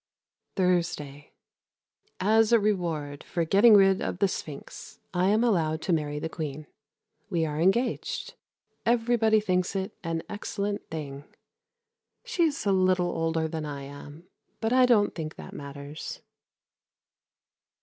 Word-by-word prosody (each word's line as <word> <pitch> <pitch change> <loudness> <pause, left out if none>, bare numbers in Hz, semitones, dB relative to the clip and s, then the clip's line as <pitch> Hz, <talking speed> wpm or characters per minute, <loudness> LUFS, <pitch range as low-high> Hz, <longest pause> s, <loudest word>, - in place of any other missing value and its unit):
Thursday. 170 -6 -1 0.9
As 220 +3 +4
a 235 - +6
reward 165 -8 -1
for 170 -2 -2
getting 205 +6 +6
rid 195 -1 +5
of - - -2
the 200 - +3
Sphinx 150 -6 -7
I 180 +1 +2
am 215 +3 +3
allowed 160 -9 +1
to 180 - +1
marry 150 -2 -1
the 150 - -3
Queen; 155 -2 -5 0.6
we 170 -4 +1
are 150 -1 -3
engaged. 240 - 0 0.5
Everybody 230 -2 +3
thinks 185 -2 0
it 195 +2 -2
an 165 -1 -2
excellent 205 0 -4
thing. 145 -3 -6 1.0
She 450 -8 +1
is 290 -7 -2
a 200 - +3
little 185 -2 +2
older 165 0 0
than 160 -1 -4
I 145 -2 -5
am; 145 +4 -11 0.3
but 225 +1 0
I 255 0 +6
don't 215 -4 +4
think 155 -2 -5
that - - -10
matters. 140 +2 -7
180 Hz, 135 wpm, -27 LUFS, 155-210 Hz, 1.0 s, a